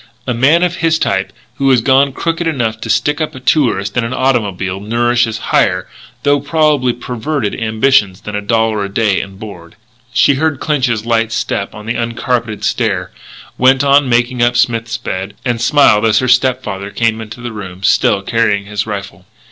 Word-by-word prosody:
A 125 - -1
man 145 +9 +3
of 175 -1 -1
his 165 -1 +1
type - - -1 0.3
who 135 0 +1
has 130 -2 +5
gone 135 +3 +3
crooked 165 +4 -2
enough 115 -8 -2
to 115 - -6
stick 145 +8 +1
up 155 -1 -3
a - - -8
tourist 120 -7 +1
in 120 - +1
an 115 +2 -3
automobile 100 -8 -1
nourishes 120 +1 0 0.2
higher 90 0 +2 0.4
though 145 0 +3
probably 145 -3 +1
perverted 125 0 -3
ambitions 110 -3 +2
than 105 - -6
a 105 - -2
dollar 110 0 0
a 100 - -4
day 100 -1 +1
and 95 -1 -9
board. 90 -6 -10 0.4
She 125 +4 +4
heard 150 0 -1
Clinch's 125 -8 0
light 115 -1 +1
step 100 -3 -3
on 105 0 -10
the 115 +1 -2
uncarpeted 115 -1 -2
stair; - - -1 0.5
went 130 +2 +4
on 140 -1 +4
making 120 +1 +1
up 120 0 +2
Smith's 115 -1 0
bed; 95 -4 -5
and 120 -2 -1
smiled 120 -6 +4
as 110 0 +3
her 130 - +1
step 130 0 +2
father 100 0 -5
came 115 +1 -1
into 110 +2 -9
the 120 -1 -6
room, 95 -3 -8
still 100 0 +2
carrying 105 -2 0
his 105 +1 -3
rifle. 100 -3 -7
115 Hz, 185 wpm, -15 LUFS, 105-130 Hz, 0.5 s, has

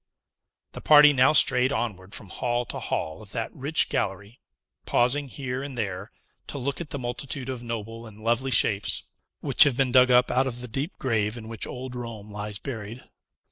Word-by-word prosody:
The - - -9
party 150 -1 +7
now 130 0 +5
strayed 130 -4 +5
onward 100 -7 -4
from 100 - -9
hall 120 +2 -1
to - - -6
hall 80 0 -3
of 105 - -14
that 115 -2 -4
rich 145 +4 0
gallery, 100 +1 -3 0.5
pausing 135 +4 +2
here 130 -1 -5
and 140 -2 -7
there, 100 -2 -4 0.4
to - - -6
look 140 +4 -3
at 160 - -7
the - - -4
multitude 125 +1 -4
of 130 -2 -4
noble 115 -1 -6
and 110 0 -14
lovely 120 +3 +1
shapes, 105 -5 +2 0.4
which - - +1
have 140 -4 +1
been 135 -2 +1
dug 125 0 +6
up 125 0 +4
out 130 +1 +2
of 120 -2 -5
the 125 - -6
deep 135 - -4
grave 110 -3 -1
in 110 -1 -9
which 115 -1 -5
old 125 0 -7
Rome 115 -4 -7
lies 105 0 -5
buried. 115 0 -7
120 Hz, 190 wpm, -26 LUFS, 110-130 Hz, 0.5 s, party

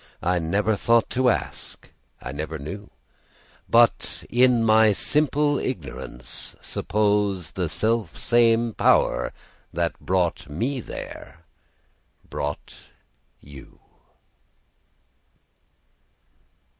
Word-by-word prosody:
I 90 0 +2
never 100 +6 +1
thought 115 +2 +2
to 130 0 +3
ask, - - -3 0.3
I 65 - -5
never 80 +3 -4
knew:But, 95 +9 -2
in 125 -1 +4
my 110 -1 +5
simple 145 +3 +1
ignorance, 70 - -6
supposeThe 100 -4 -1
self 110 +2 0
same 115 -1 +3
Power - - +2 0.4
that 85 0 -2
brought 90 -5 -1
me 120 - -2
there 85 -5 -9 0.9
brought 75 +1 -4 0.6
you. 70 -2 -14
105 Hz, 80 wpm, -24 LUFS, 80-115 Hz, 0.9 s, my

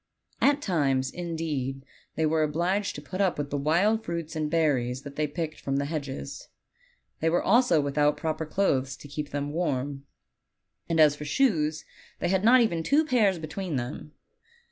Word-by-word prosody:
At 285 +1 +3
times, 135 -7 +1
in 175 -2 -5
deed, 135 -4 -3 0.3
they 160 - +1
were 155 +1 +2
obliged 175 +7 0
to 145 - -8
put 185 +6 -4
up 190 -3 +2
with 145 -1 -4
the 145 - 0
wild 190 +10 +2
fruits 170 -2 -4
and 155 -1 -1
berries 135 -6 +1
that 145 -1 -9
they 155 0 0
picked 155 +1 -4
from 135 - -2
the 140 - 0
hedges. 140 -2 -5 0.7
They 165 - +2
were 175 - +1
also 235 -4 +4
without 145 +1 +1
proper 160 0 -3
clothes 135 -8 0
to 145 - -12
keep 145 +1 -5
them 145 0 -3
warm; 140 -4 -2 0.8
and 165 -1 +1
as 150 -2 +6
for 150 - -7
shoes, 155 - +1 0.3
they 175 - -1
had 190 +1 +1
not 245 +3 +7
even 170 -8 +1
two 290 - +3
pairs 215 - +3
between 160 +1 -4
them. 130 +4 -5
155 Hz, 180 wpm, -27 LUFS, 145-175 Hz, 0.8 s, not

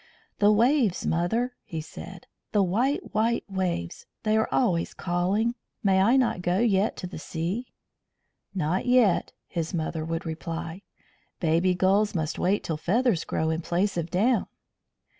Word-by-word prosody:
"The 205 0 +6
waves, 235 - +3
mother!" 225 +10 0
he 165 - -5
said. 170 +3 -9 0.3
"The 205 -2 +4
white, 240 +10 0
white 225 +3 +1
waves! 185 - -3 0.2
They 215 -1 +2
are 220 - +2
always 180 -10 +1
calling. 190 +6 0 0.3
May 190 -2 +4
I 235 +7 +5
not 240 -8 +1
go 175 +1 +1
yet 210 -2 +2
to - - -5
the 180 -2 -7
sea?" 175 +10 -3 0.9
"Not 180 +5 0
yet," 245 -7 +4 0.2
his 170 0 -3
mother 160 -1 -2
would 165 +1 -3
reply. 165 +2 -5 0.6
"Baby 170 +2 +2
gulls 195 +3 +2
must 160 -1 -2
wait 195 +3 +1
till 160 - -2
feathers 215 +2 +1
grow 160 0 0
in 160 +1 -1
place 185 +5 0
of 170 -1 -2
down." 220 +7 +2
185 Hz, 150 wpm, -26 LUFS, 170-220 Hz, 0.9 s, The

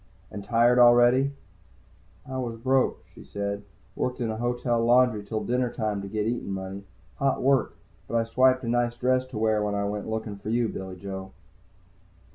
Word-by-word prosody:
"And 100 - -7
tired 120 +3 +3
already?" 120 +3 +6 1.0
"I 130 0 -4
was 120 -3 -4
broke," 130 +3 +1
she - - -13
said. 100 0 -4 0.3
"Worked 125 +1 -2
in 115 -3 -1
a 110 - -4
hotel 120 0 0
laundry 120 -2 +4
till 110 +1 -3
dinner 125 0 0
time 105 -4 -2
to 100 - -6
get 105 +1 -2
eatin' 120 -2 -2
money. 95 +1 -5 0.3
Hot 135 -1 0
work. 135 -3 +2 0.3
But - - -4
I 115 - +2
swiped 130 +3 +3
a - - -4
nice 120 0 0
dress 130 +1 +1
to 125 - -8
wear 110 -1 +2
when 105 -1 -1
I 100 - -1
went 105 +1 -4
looking 110 -2 -4
for 100 - -7
you, 115 +1 +1
Billy 95 -1 -6
Joe." 95 0 -7
115 Hz, 185 wpm, -26 LUFS, 105-125 Hz, 1.0 s, already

